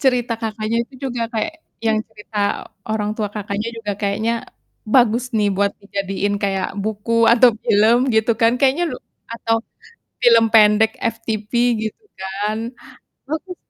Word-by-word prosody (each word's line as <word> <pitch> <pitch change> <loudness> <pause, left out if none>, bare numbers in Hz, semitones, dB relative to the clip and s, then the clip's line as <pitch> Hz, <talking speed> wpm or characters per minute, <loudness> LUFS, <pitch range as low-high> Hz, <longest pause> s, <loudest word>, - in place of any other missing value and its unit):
Cerita 245 -3 +2
Kakaknya 220 0 -2
itu 265 - -22
juga 240 -1 -3
kayak 225 +8 -1 0.3
yang 220 -1 +3
cerita 210 -1 -9 0.5
orang 210 -1 -1
tua 210 -2 -1
Kakaknya 210 +1 -3
juga 210 -3 -3
kayaknya 215 +3 0 0.6
bagus 240 -1 +4
nih, 210 -1 +3
buat 200 0 +2
dijadiin 200 0 -2
kayak 195 -2 0
buku 225 +2 +1
atau 245 +1 +7 0.2
film 215 +3 +5 0.2
gitu 220 +1 +3
kan, 230 0 +5
kayaknya 275 +6 +3
lu - - -4 0.4
atau 225 0 0 0.7
film 230 -2 +6
pendek 215 0 +6
FTV 225 -2 -3 0.4
gitu 430 - -12 0.2
kan, 200 +3 -2 0.7
bagus 320 +5 -4
220 Hz, 135 wpm, -20 LUFS, 210-230 Hz, 0.7 s, atau